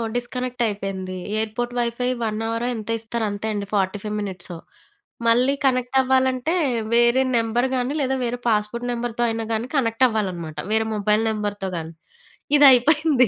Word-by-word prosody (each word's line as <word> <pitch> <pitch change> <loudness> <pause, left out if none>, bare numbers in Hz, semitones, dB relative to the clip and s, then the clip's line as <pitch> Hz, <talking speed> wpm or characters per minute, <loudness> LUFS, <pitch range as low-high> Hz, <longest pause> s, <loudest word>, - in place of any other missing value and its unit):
Disconnect 250 0 -3
అయిపోయింది. 195 -3 -4 0.2
Airport 230 +3 -3
wifi 240 +1 -1 0.2
1 215 -1 -2
hour 230 +1 -2
ఎంత 220 -1 -7
ఇస్తారో 225 0 -2
అంతే 205 +2 -4
అండి. 205 -1 -3
45 205 +2 -1
మినిట్స్. 185 -3 -6 0.7
మళ్ళీ 245 +4 +4
కనెక్ట్ 255 0 +1
అవ్వాలంటే 260 +3 +1 0.4
వేరే 240 +2 +4
నెంబర్ 230 +2 +1
గాని, 255 +2 -1
లేదా 265 -1 0
వేరే 240 +1 -3
పాస్పోర్ట్ 220 +3 -1
నెంబర్‌తో 240 0 -2
అయినా 225 0 -3
కానీ 225 +2 -2
కనెక్ట్ 240 -2 +3
అవ్వాలన్నమాట. 180 -8 -3 0.2
వేరే 220 0 +2
మొబైల్ 210 +1 +2
నెంబర్‌తో 205 -2 -3
కాని. 165 0 -6 0.6
ఇది 290 - +7
అయిపోయింది. 285 0 +4
230 Hz, 145 wpm, -22 LUFS, 210-250 Hz, 0.7 s, ఇది